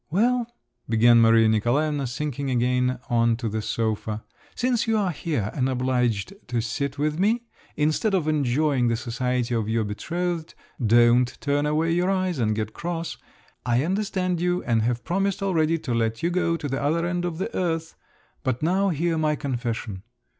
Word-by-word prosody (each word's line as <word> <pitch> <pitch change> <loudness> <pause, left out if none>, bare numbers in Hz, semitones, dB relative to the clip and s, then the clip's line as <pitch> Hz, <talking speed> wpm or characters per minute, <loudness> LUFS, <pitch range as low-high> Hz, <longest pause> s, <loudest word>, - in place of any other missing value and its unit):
"Well," 235 +7 +2 0.4
began 115 +1 +6
Maria 115 0 +5
Nikolaevna, 135 +6 +1
sinking 140 +2 -3
again 125 0 +1
on 115 -1 +2
to 120 -1 -3
the 110 0 -2
sofa. 110 -1 -2 0.3
"Since 245 -2 0
you 225 -1 +2
are 195 -4 +1
here 145 - -2
and 130 -1 0
obliged 125 - 0
to 120 -1 -1
sit 130 +5 -3
with 150 +2 -1
me, 225 +5 +2 0.3
instead 155 +8 +1
of 165 -5 0
enjoying 140 -3 +2
the 115 - +2
society 125 +1 -2
of 110 -2 -1
your 115 0 +1
betrothed—don't 125 -4 +1
turn 145 0 0
away 155 +2 +1
your 175 +2 +1
eyes 185 -5 0
and 110 -2 +1
get 110 0 -3
cross—I 165 -7 -4
understand 185 -2 -1
you, 180 0 0
and 115 -2 +1
have 120 +1 -1
promised 195 +3 -1
already 165 -4 +2
to 130 -6 -4
let 115 +1 -1
you 170 - +1
go 170 -2 +1
to 150 - -4
the 135 0 -2
other 160 +4 +1
end 175 0 -1
of 175 -2 -3
the 195 +6 -4
earth—but 160 -6 -4
now 190 +4 +2
hear 165 0 0
my 155 -1 +1
confession. 120 -8 -3
140 Hz, 165 wpm, -25 LUFS, 120-170 Hz, 0.4 s, began